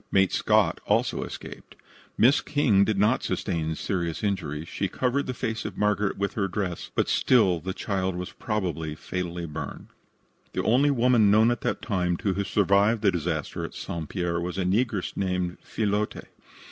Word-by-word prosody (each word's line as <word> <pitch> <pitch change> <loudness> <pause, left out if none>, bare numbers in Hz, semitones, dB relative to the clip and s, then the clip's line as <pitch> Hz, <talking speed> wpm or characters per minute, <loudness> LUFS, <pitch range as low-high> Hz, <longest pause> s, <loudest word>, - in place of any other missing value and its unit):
Mate 95 -1 +4
Scott - - +2
also - - +1
escaped. - - -9 0.4
Miss 130 +5 +5
King 135 -10 +3
did 105 0 0
not 105 +6 +3
sustain 80 -4 -2
serious 85 -1 -2
injuries. 85 -6 -2
She 100 - -2
covered 130 +8 -1
the 130 - -2
face 110 -1 -3
of 105 - -6
Margaret 105 -1 +1
with 100 0 -1
her 100 -3 0
dress, 90 -3 -3
but - - +2
still 100 -9 +3
the 95 +4 -4
child 95 -1 -2
was 90 0 -5
probably 85 - -3
fatally 90 +1 -4
burned. 75 -2 -7 0.6
The - - -1
only 130 +6 +4
woman 120 -5 +4
known 110 +3 +5
at 120 - -2
that - - -2
time 90 -5 0
to 100 -1 0
have 100 +1 -2
survived 105 +3 +3
the 100 - +5
disaster 80 -3 -3
at - - -6
St. 80 -3 -5
Pierre 85 -3 -1
was 90 +1 -4
a 95 - 0
negress 100 +1 0
named 90 -2 -1
Fillotte. 105 -1 -2
100 Hz, 170 wpm, -26 LUFS, 90-110 Hz, 0.6 s, Miss